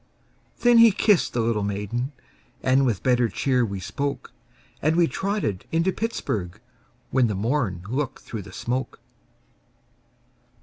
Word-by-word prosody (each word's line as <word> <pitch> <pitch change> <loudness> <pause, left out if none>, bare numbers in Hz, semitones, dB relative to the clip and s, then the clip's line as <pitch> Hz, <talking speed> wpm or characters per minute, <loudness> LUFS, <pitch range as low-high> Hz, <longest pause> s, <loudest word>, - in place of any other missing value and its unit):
Then 240 -1 +6
he 230 0 +9
kissed 200 -1 +2
the 120 - +1
little 115 -2 0
maiden, 105 +6 -2 0.5
And 130 +1 +3
with 110 -6 -1
better 125 -2 +3
cheer 125 0 +1
we 100 -4 -3
spoke, 140 +8 -4 0.5
And 155 +2 +2
we 170 0 +5
trotted 195 - -2
into 165 +3 +2
Pittsburg, 105 - -3 0.5
When 130 -2 +3
the 105 - -2
morn 105 -4 -1
looked 130 +4 -3
through 110 - -6
the - - -12
smoke. 125 +2 -3
125 Hz, 135 wpm, -24 LUFS, 105-155 Hz, 0.5 s, he